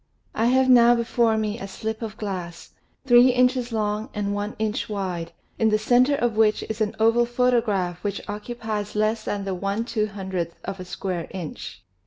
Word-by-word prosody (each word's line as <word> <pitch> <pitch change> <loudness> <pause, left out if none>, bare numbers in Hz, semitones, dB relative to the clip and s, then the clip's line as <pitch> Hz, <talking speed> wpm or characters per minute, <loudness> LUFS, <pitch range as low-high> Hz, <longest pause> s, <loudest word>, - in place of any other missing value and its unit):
I 225 +2 +1
have 260 +1 +3
now 240 -1 +7
before 235 -1 +1
me 215 +1 -2
a 195 - -6
slip 220 +3 -5
of 225 -1 -6
glass, 180 -5 -6 0.3
three 245 -1 +7
inches 250 -1 +2
long 215 -1 -1
and 205 -1 -1
one 205 +1 -3
inch 215 0 -2
wide, 180 -5 -3 0.3
in 225 - +4
the 215 - +3
center 245 +6 +3
of 240 -5 0
which 215 -1 +3
is 220 0 -5
an 210 -1 0
oval 230 +2 +3
photograph 230 -8 0
which 205 -1 -4
occupies 210 -1 -5
less 215 +1 0
than 200 -1 -3
the 195 - -2
i 195 +2 -2
2OOth 195 -6 -3
of 195 0 -5
a 185 - -6
square 180 -1 -4
inch. 175 -5 -7
215 Hz, 180 wpm, -24 LUFS, 200-235 Hz, 0.3 s, now